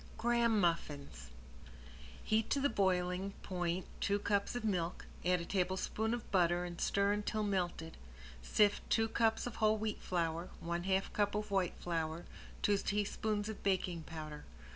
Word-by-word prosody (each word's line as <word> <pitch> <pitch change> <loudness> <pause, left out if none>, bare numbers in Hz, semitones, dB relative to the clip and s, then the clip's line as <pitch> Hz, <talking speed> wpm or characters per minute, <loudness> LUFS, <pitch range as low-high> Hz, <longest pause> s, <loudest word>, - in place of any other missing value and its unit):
~GRAHAM 235 -2 +3
MUFFINS~ 145 - -1 1.0
Heat 220 0 +1
to 280 - +2
the 285 +1 +3
boiling 185 0 +1
point 175 -1 -1
two 200 - +2
cups 205 +2 0
of 245 -2 -3
milk, 180 -5 -1 0.2
add 180 0 +2
a - - -5
tablespoon 190 +5 0
of 240 - -9
butter 175 -1 +3
and 175 -1 -6
stir 200 0 +2
until 210 +1 0
melted. 175 -5 -1 0.4
Sift 205 - +3
two 225 -1 +3
cups 225 0 +2
of 245 - -5
whole 215 0 +4
wheat 215 0 -3
flour, 170 -1 -1
one 170 +1 -3
half 190 0 +1
cup 205 -1 +1
of 210 0 -2
white 190 -3 +1
flour, 165 -1 -2 0.4
two 205 -1 +3
teaspoons 210 +1 -1
of 220 -2 -6
baking 185 -3 0
powder. 155 -2 -7
195 Hz, 155 wpm, -35 LUFS, 175-210 Hz, 1.0 s, whole